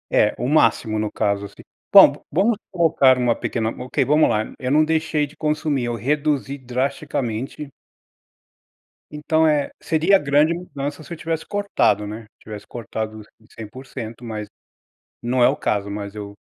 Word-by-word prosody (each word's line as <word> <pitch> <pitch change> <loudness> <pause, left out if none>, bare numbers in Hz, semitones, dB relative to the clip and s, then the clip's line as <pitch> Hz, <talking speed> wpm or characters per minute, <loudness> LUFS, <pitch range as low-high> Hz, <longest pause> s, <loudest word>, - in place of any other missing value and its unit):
É, 105 - +3
o 120 - -2
máximo, 115 -6 +2
no 105 -1 -2
caso, 100 0 -1
assim. - - -13 0.3
Bom, - - +7
vamos 215 +2 +2
colocar 160 -7 +4
uma 120 -2 +1
pequena 110 -2 -2
Ok, 125 +2 -2
vamos 150 +2 +4
lá. 110 0 -1
Eu 125 - -3
não 155 +2 +4
deixei 160 -1 0
de 145 +2 -15
consumir, 150 -4 -1
eu 120 0 -2
reduzi 140 +2 -1
drasticamente. 135 0 -3 1.4
Então, 160 +1 +1
eh, 150 -2 +1
seria 165 +5 +3
grande 145 +3 +3
mudança 145 -4 -6
se 165 - -9
eu - - -7
tivesse 165 0 -3
cortado, 200 - +1
né, 105 +2 -7
se 110 - -26
tivesse 105 -1 -9
cortado, 110 -1 -6
assim, 110 +1 -21
100%, 115 0 -9
mas 105 -2 -6 0.7
não 125 +1 +1
é - - +7
o - - 0
caso. 100 -1 -2
Mas 100 0 -6
eu 100 -1 -8
130 Hz, 160 wpm, -21 LUFS, 110-155 Hz, 1.4 s, Bom